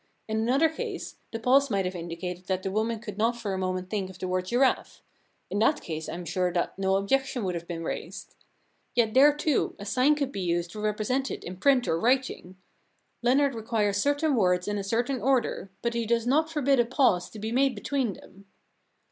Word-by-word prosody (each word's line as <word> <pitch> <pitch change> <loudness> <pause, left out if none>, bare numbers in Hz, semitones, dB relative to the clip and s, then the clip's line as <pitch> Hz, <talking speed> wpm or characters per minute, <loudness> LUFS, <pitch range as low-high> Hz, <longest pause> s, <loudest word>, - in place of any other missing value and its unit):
In 220 0 -1
another 260 +8 +3
case 315 - -6
the 225 - -3
pause 265 +5 +3
might 195 -3 0
have 180 - -2
indicated 175 +1 -6
that 185 -1 -1
the 195 - -2
woman 220 +3 0
could 210 -2 -8
not 230 +2 +2
for 210 -4 -3
a - - -2
moment 185 0 -3
think 195 -3 -2
of 190 - -11
the 185 - -4
word 185 0 -1
giraffe. 255 +5 +1 0.5
In 205 - 0
that 290 +7 +3
case 160 -1 -5
I - - -4
am 175 0 -7
sure 180 0 0
that 175 - -1
no 190 0 +2
objection 255 +5 0
would 185 -2 -1
have 170 0 -5
been 165 -1 -5
raised. - - -6 0.6
Yet 225 -3 +2
there, 280 +3 +7
too, 295 -1 0
a 200 - -8
sign 255 +8 +3
could 280 -2 -2
be 200 - -4
used 175 -1 -1
to 215 - -8
repre 210 0 -1
sent 265 +4 0
it - - -6
in 180 +1 -7
print 265 +3 +3
or 165 - +1
writing. 240 -6 0 0.6
Leonard 270 +3 +3
requires 220 -3 0
certain 285 +6 +1
words 180 -4 +2
in 205 0 -1
a - - -3
certain 240 +5 -1
order, 245 -6 +1
but 235 0 0
he 235 -1 -2
does 230 0 +1
not 305 +6 +2
forbid 280 -4 +2
a 240 - +4
pause 240 -8 +2
to - - -11
be 220 +2 -4
made 265 +1 +2
between 245 +1 -1
them. 195 +2 -16
220 Hz, 220 wpm, -27 LUFS, 185-260 Hz, 0.6 s, there